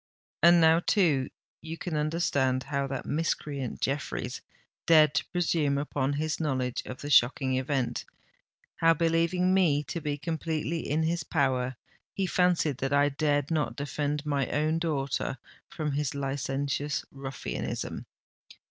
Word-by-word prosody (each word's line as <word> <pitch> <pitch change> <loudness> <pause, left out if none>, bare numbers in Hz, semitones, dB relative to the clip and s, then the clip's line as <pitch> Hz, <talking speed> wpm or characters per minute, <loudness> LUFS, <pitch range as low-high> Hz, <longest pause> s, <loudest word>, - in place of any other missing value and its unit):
And 170 +1 +7
now, 160 0 +6
too, 165 -9 +2 0.3
you 160 +1 -6
can 175 -2 -4
understand 145 -4 +1
how 140 -1 -2
that 135 -1 -4
miscreant 145 -4 -2
Jeffreys 140 +2 -2 0.5
dared 155 -2 +6
to - - 0
presume 160 -5 +1
upon 140 -1 -1
his 155 +2 -2
knowledge 130 -5 -1
of 130 - -7
the 145 - -5
shocking 130 +1 +4
event—how, 140 +4 -2
believing 170 +3 +2
me 160 -6 +3
to 165 +3 -5
be 145 -1 -2
completely 160 +1 -2
in 155 +3 +1
his 170 +2 0
power, 130 -4 0 0.4
he 195 - 0
fancied 180 -6 +2
that 135 +1 -1
I 145 0 +4
dared 145 0 0
not 155 -2 0
defend 145 0 -2
my 140 -3 0
own 155 +2 +1
daughter 140 -4 -1 0.3
from 150 -2 -3
his 140 0 -1
licentious 140 +1 -2
ruffianism. 135 - -5
145 Hz, 135 wpm, -28 LUFS, 135-165 Hz, 0.5 s, And